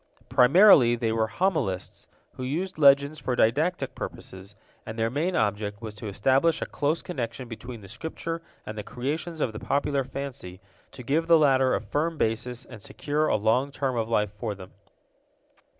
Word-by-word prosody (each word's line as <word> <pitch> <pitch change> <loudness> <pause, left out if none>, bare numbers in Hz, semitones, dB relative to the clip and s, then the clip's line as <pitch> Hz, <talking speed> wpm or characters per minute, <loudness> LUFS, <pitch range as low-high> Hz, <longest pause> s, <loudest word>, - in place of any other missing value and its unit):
Primarily 130 - +6
they 115 -2 -1
were 110 0 +1
homilists, 110 - -2 0.3
who - - -9
used 155 +7 -3
legends 140 +1 +5
for 125 - -2
didactic 150 +12 +1
purposes, 95 +2 -8 0.3
and 110 - -8
their 115 0 0
main 165 +7 -1
object 105 -1 -1
was 110 -2 -7
to 105 +1 -8
establish 135 +11 +2
a - - -2
close 150 +3 -1
connection 125 -6 -5
between 115 0 -8
the 100 - -12
Scripture 165 - -5 0.2
and 105 - -6
the 105 - -4
creations 155 +8 -4
of 115 - 0
the 105 - -6
popular 140 -1 0
fancy, 130 -9 -7 0.3
to 125 - -10
give 155 +7 0
the 170 -1 +7
latter 135 -4 +3
a - - 0
firm 160 +2 -2
basis 120 +2 -2
and 115 -4 -12
secure 150 +8 -2
a - - +2
long 110 +6 +2
term 135 -2 -2
of 115 -1 -1
life 105 -3 +1
for 105 -2 -3
them. 95 -1 -12
125 Hz, 175 wpm, -26 LUFS, 110-150 Hz, 0.3 s, the